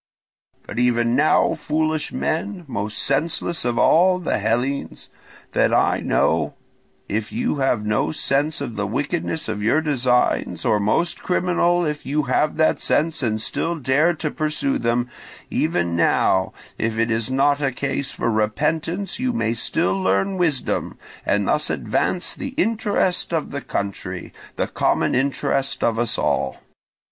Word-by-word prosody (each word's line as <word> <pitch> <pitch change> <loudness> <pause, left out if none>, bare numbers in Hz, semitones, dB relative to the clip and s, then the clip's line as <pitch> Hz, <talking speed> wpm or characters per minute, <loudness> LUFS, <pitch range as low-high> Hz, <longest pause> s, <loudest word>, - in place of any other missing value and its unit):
"But - - -5
even 120 -1 +2
now, 150 +4 +4
foolish 155 0 -1
men, 175 +3 -2
most 105 -4 -3
senseless 160 +4 -1
of 120 -1 -1
all 180 +7 +5
the 180 -9 -1
Hellenes 120 +6 -2 0.4
that - - +2
I - - +3
know, - - +1 0.5
if 105 +1 -2
you 240 -8 -1
have 125 -6 +1
no 105 0 +1
sense 150 +1 0
of 115 -3 -5
the 105 -1 -1
wickedness 150 - -2
of 105 - -3
your 115 +9 +3
designs, 130 -5 +1
or 110 -3 +3
most 110 +12 0
criminal 175 -1 +1
if 150 -1 -3
you 150 +3 0
have 145 +4 +1
that 160 0 +2
sense 160 0 +1
and 110 -4 0
still 165 +9 -2
dare 150 +4 +2
to 155 -1 -3
pursue 160 - -1
them—even 115 -7 -2
now, 95 +2 +2 0.3
if 115 0 -1
it 115 +1 +1
is 115 +1 -1
not 140 +2 +2
a 140 -2 +1
case 140 +1 -2
for 115 - -1
repentance, 155 - -1
you 255 0 +1
may 235 - 0
still 95 -4 0
learn 95 - +1
wisdom, 160 -7 -1 0.3
and 100 -1 +2
thus 150 0 +1
advance 180 -1 -1
the 270 - -6
interest 210 - +1
of 165 -3 -1
the 140 - -4
country, 95 -4 -4 0.2
the - - 0
common - - +1
interest 135 +1 0
of 115 -1 +1
us 120 -2 0
all. - - 0
140 Hz, 150 wpm, -22 LUFS, 115-160 Hz, 0.5 s, all